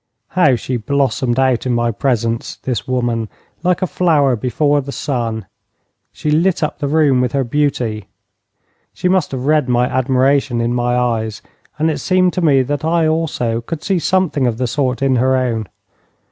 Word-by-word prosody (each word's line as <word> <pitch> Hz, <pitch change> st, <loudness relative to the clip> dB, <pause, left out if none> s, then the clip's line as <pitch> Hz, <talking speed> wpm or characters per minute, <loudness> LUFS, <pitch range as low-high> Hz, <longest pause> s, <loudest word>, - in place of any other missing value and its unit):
How 150 Hz, -8 st, +3 dB
she 125 Hz, +2 st, -3 dB
blossomed 130 Hz, 0 st, 0 dB
out 130 Hz, -2 st, +1 dB
in 125 Hz, -, +1 dB
my 120 Hz, 0 st, +1 dB
presence, 115 Hz, -2 st, -1 dB
this 125 Hz, -5 st, -3 dB
woman, 120 Hz, -3 st, -1 dB, 0.3 s
like 180 Hz, +1 st, +1 dB
a -, -, +3 dB
flower 155 Hz, -7 st, +2 dB
before 145 Hz, +6 st, +1 dB
the 140 Hz, +1 st, -7 dB
sun! 115 Hz, -7 st, -3 dB, 0.7 s
She 150 Hz, -, -3 dB
lit 170 Hz, +3 st, +2 dB
up 150 Hz, -, -2 dB
the 145 Hz, -, -1 dB
room 145 Hz, -4 st, +3 dB
with 125 Hz, -2 st, -1 dB
her 140 Hz, -1 st, +1 dB
beauty. 120 Hz, -6 st, -1 dB, 0.9 s
She -, -, -2 dB
must 185 Hz, -3 st, +2 dB
have 130 Hz, -1 st, -4 dB
read 150 Hz, -3 st, +2 dB
my 125 Hz, 0 st, +3 dB
admiration 130 Hz, 0 st, +1 dB
in 120 Hz, +1 st, 0 dB
my 120 Hz, 0 st, 0 dB
eyes, 115 Hz, -3 st, -1 dB, 0.3 s
and 160 Hz, +2 st, +1 dB
it 150 Hz, -, -3 dB
seemed 185 Hz, -1 st, +2 dB
to 185 Hz, -, -1 dB
me 140 Hz, -5 st, +4 dB
that 145 Hz, +3 st, -3 dB
I 165 Hz, 0 st, +2 dB
also 155 Hz, -8 st, -1 dB
could 150 Hz, +6 st, -6 dB
see 190 Hz, -3 st, +1 dB
something 170 Hz, -7 st, +1 dB
of 115 Hz, -2 st, -1 dB
the 125 Hz, -, -1 dB
sort 130 Hz, 0 st, -1 dB
in 135 Hz, -2 st, +2 dB
her 130 Hz, +2 st, +2 dB
own. 115 Hz, -5 st, -1 dB
130 Hz, 180 wpm, -17 LUFS, 120-150 Hz, 0.9 s, me